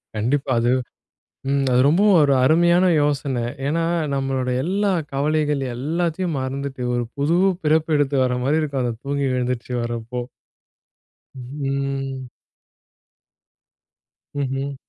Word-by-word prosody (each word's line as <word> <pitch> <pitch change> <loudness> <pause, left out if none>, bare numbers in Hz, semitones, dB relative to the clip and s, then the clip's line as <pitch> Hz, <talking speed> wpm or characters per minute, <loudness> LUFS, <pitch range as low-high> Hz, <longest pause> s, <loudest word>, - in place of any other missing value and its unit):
கண்டிப்பா. 130 +6 0
அது, 120 +1 +2 0.8
ம் 140 0 +1
அது 125 +1 +4
ரொம்பவும் 190 +5 +4
ஒரு 140 -1 +3
அருமையான 170 +5 +4 0.2
யோசனை. 140 -4 0 0.2
ஏன்னா, 165 +3 0 0.3
நம்மளோட 135 -2 -1
எல்லா 200 +3 0 0.2
கவலைகள் 150 0 0
எல்லாத்தையும் 165 +4 -1
மறந்துட்டு, 135 0 -4
ஒரு 120 - 0
புது 150 +5 +2 0.3
பிறப்பு 155 +1 +2
எடுத்து 145 -1 +1
வர 125 0 0
மாதிரி 155 +4 +2
இருக்கும். 140 -4 -2
அந்த 120 -2 -2
தூங்கி 140 0 -1
எழுந்திரிச்சு 125 0 -2
வரப்போ. 120 +1 -4 1.1
ஹ்ம். 135 0 -4 2.1
ம்ஹ்ம். 135 +1 -2
140 Hz, 110 wpm, -22 LUFS, 130-155 Hz, 2.1 s, அது